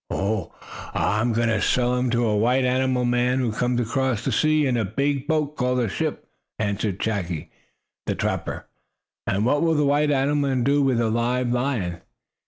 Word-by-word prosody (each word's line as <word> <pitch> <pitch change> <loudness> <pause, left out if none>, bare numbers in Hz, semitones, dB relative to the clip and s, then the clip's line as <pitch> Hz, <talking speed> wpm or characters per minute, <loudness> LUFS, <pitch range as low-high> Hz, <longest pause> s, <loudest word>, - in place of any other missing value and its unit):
"Oh, 100 -2 -2 0.4
I 105 +4 +1
am 120 +1 +1
going 115 0 +1
to 110 - +1
sell 125 0 +2
him 125 0 0
to 120 0 +1
a 105 -2 +1
white 125 +5 +2
animal 130 0 +1
man 125 +1 +1
who 125 -4 0
comes 125 +2 0
from 115 - -2
across 130 -3 -1
the 135 - 0
sea 155 +6 +2
in 130 -2 +1
a 115 - +1
big 140 +6 -1
boat 150 -2 0
called 125 -1 0
a 120 - +1
ship," - - -3 0.3
answered 105 -2 -1
Chaki, 90 -7 -3 0.6
the - - 0
trapper. - - -3 0.6
"And 100 +3 +1
what 145 +4 +2
will 165 -1 +2
the 150 -1 +2
white 145 +1 +2
animal 140 0 +1
man 130 -2 0
do 140 +3 +3
with 130 -4 +2
a 115 -2 +1
live 120 +2 0
lion?" 120 -10 -1
125 Hz, 195 wpm, -23 LUFS, 110-135 Hz, 0.6 s, do